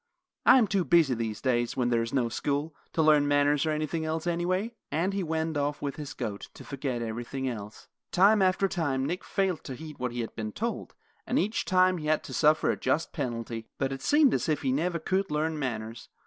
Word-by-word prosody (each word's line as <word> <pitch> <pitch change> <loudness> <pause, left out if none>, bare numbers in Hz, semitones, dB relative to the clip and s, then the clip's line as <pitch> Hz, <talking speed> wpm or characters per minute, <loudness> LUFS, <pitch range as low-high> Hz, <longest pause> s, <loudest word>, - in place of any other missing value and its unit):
I - - +9
am 245 - +5
too 195 -2 +1
busy 165 -6 +4
these 115 -2 -3
days, 120 -2 0
when 125 -2 +1
there 120 -1 +2
is 115 +1 -3
no 125 -3 +1
school, 145 +6 -2 0.2
to 160 - +2
learn 150 -2 +5
manners 145 +1 +3
or - - +2
anything 155 +1 -1
else, 160 +1 -2
anyway," 180 +6 0 0.2
and 170 +7 0
he 200 - -1
went 160 -2 -1
off 145 0 -1
with 140 -1 -4
his 150 -2 -7
goat, 105 -5 -5
to - - -10
forget 130 -4 -3
everything 120 +4 -4
else. 105 -4 -7 0.2
Time 200 +3 +5
after 190 +1 +3
time 145 -8 -1
Nick 175 +6 -3
failed 190 -5 -1
to 130 - -5
heed 155 +1 -10
what 125 -1 -2
he 120 0 -3
had 115 - -5
been 110 -1 -4
told, 230 +2 -4 0.3
and 250 - +1
each 215 -4 0
time 185 -1 +3
he 150 - -5
had 155 0 +2
to - - -8
suffer 155 0 +3
a - - -3
just 165 - 0
penalty; 115 -2 -4
but 135 -1 -1
it 135 0 -5
seemed 295 - +4
as - - 0
if 150 - 0
he 130 - +1
never 170 +6 0
could 190 +4 -1
learn 155 +1 -1
manners. 115 -3 -4
150 Hz, 225 wpm, -28 LUFS, 125-175 Hz, 0.3 s, I